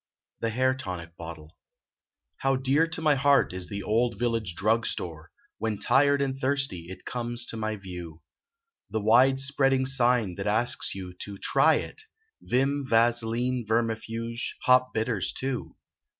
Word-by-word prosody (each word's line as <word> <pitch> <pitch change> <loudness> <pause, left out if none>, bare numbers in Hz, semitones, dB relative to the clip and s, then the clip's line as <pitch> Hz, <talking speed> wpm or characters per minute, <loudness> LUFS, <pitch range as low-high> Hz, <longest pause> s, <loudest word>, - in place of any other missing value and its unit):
THE 115 - -1
HAIR 130 +3 +2
TONIC 90 -10 -7
BOTTLE 80 -2 -10 0.8
How 135 0 +1
dear 135 +5 +2
to 160 0 -4
my 155 -1 +5
heart 140 -5 +3
is 90 -1 -6
the 100 0 -4
old 115 +1 +1
village 115 -6 -1
drug 110 +4 +1
store, 80 -2 -5 0.3
When 110 -2 -1
tired 140 +3 +3
and 135 -1 -3
thirsty 130 -11 -1
it 95 - -10
conies 120 0 -3
to - - -4
my 110 0 -2
view. 90 -5 -9 0.7
The 110 - -1
wide 125 +5 +5
spreading 135 -1 +2
sign 125 -6 +2
that 100 - -3
asks 110 +1 0
you 90 -2 -7
to 100 -1 -7
"Try - - +3
it," - - -4 0.4
Vim, 135 +3 0
Vaseline, 120 +2 +2
Vermifuge, 115 +1 -2
Hop 125 0 +4
Bitters, 110 -4 -1
too. 130 -1 -4
115 Hz, 150 wpm, -27 LUFS, 100-130 Hz, 0.8 s, my